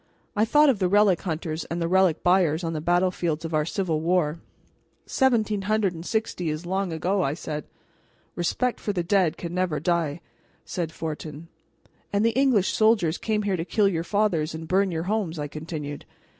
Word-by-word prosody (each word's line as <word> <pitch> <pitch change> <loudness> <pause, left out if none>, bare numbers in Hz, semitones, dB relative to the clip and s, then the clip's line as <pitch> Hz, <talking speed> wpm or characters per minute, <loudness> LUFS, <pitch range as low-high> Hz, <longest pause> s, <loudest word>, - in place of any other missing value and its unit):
I 215 +1 +3
thought 295 +6 +5
of 240 -7 +2
the 185 - +2
relic 200 -2 +4
hunters 160 -2 -3
and 170 - -4
the 165 - 0
relic 185 -2 +3
buyers 175 -3 +3
on 165 -1 -2
the 155 - -3
battlefields 175 -2 0
of 165 - -5
our 155 -1 +2
civil 170 -3 -1
war. 165 -2 +1 0.7
"Seventeen 220 -6 +1
hundred 205 -1 +1
and 165 -1 -8
sixty 215 -5 -2
is 155 +3 -4
long 190 0 -1
ago," 185 +5 0
I 145 -4 0
said. 150 -3 -5 0.7
"Respect 245 +8 -1
for 205 - -2
the 175 -3 -1
dead 185 -2 +2
can 170 -1 -6
never 180 -5 0
die," 170 -1 0 0.4
said 170 -3 -3
Fortin. 155 0 -6 0.6
"And 205 +2 +2
the 230 - +4
English 250 -7 +2
soldiers 210 -7 +3
came 215 -1 -1
here 200 -2 0
to 165 - -2
kill 205 +3 +2
your 165 -4 0
fathers 175 -5 0
and 160 0 -7
burn 190 +3 +2
your 165 -2 -2
homes," 190 -4 -1
I 145 -1 -3
continued. 150 -1 -6
175 Hz, 185 wpm, -25 LUFS, 160-200 Hz, 0.7 s, thought